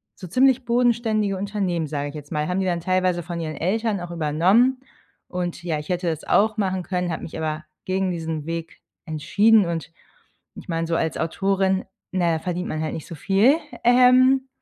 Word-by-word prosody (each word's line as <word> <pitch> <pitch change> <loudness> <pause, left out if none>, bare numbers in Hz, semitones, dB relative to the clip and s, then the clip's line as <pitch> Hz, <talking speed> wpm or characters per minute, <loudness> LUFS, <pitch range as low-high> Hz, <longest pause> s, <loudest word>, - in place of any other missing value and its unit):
so 185 - -9
ziemlich 260 +5 +3
bodenständige 230 -4 +1
Unternehmen- 190 -5 -2
sage 145 -1 -3
ich 150 - -10
jetzt 145 0 -9
mal- 150 -1 -1
haben 180 +1 -1
die 190 - 0
dann 170 -1 -1
teilweise 185 -1 +1
von 170 0 -5
ihren 155 -2 -4
Eltern 210 +5 -1
auch 175 0 -7
übernommen. 180 - +3 0.5
Und 175 -1 -4
ja, 160 -4 -1
ich 150 - -10
hätte 180 -1 -1
das 160 -2 -2
auch 215 +1 +2
machen 190 -3 -1
können, 180 0 -2
hab 160 - -4
mich 165 - -7
aber 155 0 -3 0.2
gegen 190 0 0
diesen 160 -3 -4
Weg 165 0 -6 0.2
entschieden. 200 +7 +3
Und 165 -1 -4 0.6
ich - - -11
meine, 165 -1 -2
so 165 - 0
als 160 -1 -1
Autorin, 190 +2 0 0.3
na 175 -3 +1
ja, 160 - -1
verdient 180 +2 -3
man 155 - -3
halt 155 - -3
nicht 160 - -7
so 165 - -8
viel, 205 - +3 0.3
ähm. 255 +2 +5
180 Hz, 195 wpm, -23 LUFS, 165-205 Hz, 0.6 s, ähm